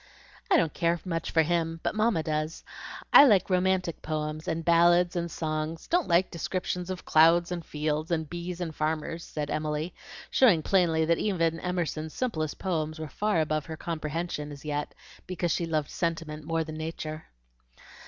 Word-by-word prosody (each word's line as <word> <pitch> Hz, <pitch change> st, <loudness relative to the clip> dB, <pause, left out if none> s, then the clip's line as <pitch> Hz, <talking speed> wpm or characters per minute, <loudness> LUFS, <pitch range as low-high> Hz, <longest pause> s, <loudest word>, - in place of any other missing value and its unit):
"I -, -, +6 dB
don't 165 Hz, -2 st, +1 dB
care 170 Hz, 0 st, +1 dB
much 165 Hz, -2 st, -2 dB
for 160 Hz, -, +3 dB
him, 165 Hz, 0 st, -1 dB
but -, -, 0 dB
Mamma 215 Hz, -6 st, +1 dB
does. 155 Hz, +1 st, -2 dB, 0.5 s
I -, -, +11 dB
like 200 Hz, -8 st, +4 dB
romantic 185 Hz, -2 st, +1 dB
poems, 155 Hz, 0 st, -3 dB
and 165 Hz, 0 st, -2 dB
ballads, 175 Hz, +1 st, +4 dB
and 170 Hz, -1 st, -1 dB
songs; 155 Hz, 0 st, -3 dB
don't 350 Hz, 0 st, +1 dB
like 175 Hz, +1 st, +3 dB
descriptions 180 Hz, +1 st, -3 dB
of 185 Hz, -1 st, -5 dB
clouds 165 Hz, +2 st, +5 dB
and 175 Hz, -1 st, -3 dB
fields, 150 Hz, +1 st, -2 dB
and 160 Hz, -2 st, -1 dB
bees, 175 Hz, +2 st, -5 dB
and 170 Hz, -3 st, -3 dB
farmers," 155 Hz, +2 st, -2 dB
said 150 Hz, -1 st, -4 dB
Emily, 155 Hz, +2 st, -2 dB, 0.4 s
showing 195 Hz, -12 st, +5 dB
plainly 165 Hz, -4 st, +3 dB
that 170 Hz, +1 st, +2 dB
even 165 Hz, -5 st, 0 dB
Emerson's 165 Hz, -3 st, -3 dB
simplest 155 Hz, -12 st, -2 dB
poems 155 Hz, -4 st, -2 dB
were 155 Hz, -1 st, -6 dB
far 205 Hz, 0 st, +1 dB
above 155 Hz, 0 st, -1 dB
her 160 Hz, -1 st, -6 dB
comprehension 160 Hz, -1 st, -4 dB
as 145 Hz, +1 st, -11 dB
yet, 145 Hz, -1 st, -3 dB, 0.3 s
because 175 Hz, -2 st, -1 dB
she 170 Hz, -, 0 dB
loved 155 Hz, -3 st, -1 dB
sentiment 160 Hz, -3 st, -3 dB
more 165 Hz, 0 st, 0 dB
than 155 Hz, -1 st, -7 dB
Nature. 155 Hz, -1 st, -5 dB
165 Hz, 170 wpm, -28 LUFS, 155-175 Hz, 0.5 s, I